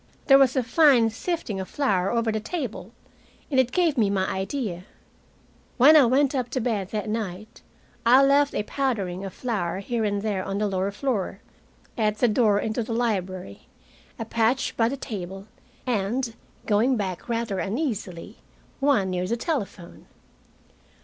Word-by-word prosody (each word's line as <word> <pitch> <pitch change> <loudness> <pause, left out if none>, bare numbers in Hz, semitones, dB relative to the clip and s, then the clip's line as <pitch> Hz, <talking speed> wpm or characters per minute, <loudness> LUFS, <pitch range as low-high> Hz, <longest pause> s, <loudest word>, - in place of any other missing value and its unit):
There 270 -2 +7
was 265 -1 +4
a 260 - +2
fine 245 -3 +4
sifting 250 - -3
of 190 - -5
flour 195 -10 0
over 230 0 0
the 220 - -1
table, 230 - -5 0.6
and 265 - +3
it 255 -1 +2
gave 325 -6 +1
me 210 -3 +3
my 190 -1 0
idea. 190 -2 -3 0.9
When 280 +5 +7
I 285 -5 +7
went 270 +3 +2
up 250 -3 -1
to 260 - -2
bed 220 -6 -2
that 215 0 -3
night, 215 -2 -5 0.4
I 255 +4 +6
left 280 +1 +3
a - - 0
powdering 205 -8 -2
of 195 - -5
flour 200 -9 -3
here 225 +4 -2
and 205 -1 -1
there 200 -3 -1
on 195 - -3
the 210 - 0
lower 190 0 -1
floor, 205 -3 -2 0.6
at 215 -1 +1
the 245 - +3
door 210 -2 +3
into 220 +3 -2
the 230 +1 -4
library, 190 - -3 0.5
a 225 - -4
patch 230 +4 0
by 225 0 +2
the 275 - -4
table, 195 -5 -6 0.4
and 235 +1 -1 0.3
going 230 +5 +2
back 190 0 -4
rather 230 -4 -1
uneasily 205 - -4 0.4
one 270 -10 +2
near 180 0 -2
the 235 - -1
telephone. 215 - -5
225 Hz, 165 wpm, -25 LUFS, 195-255 Hz, 0.9 s, There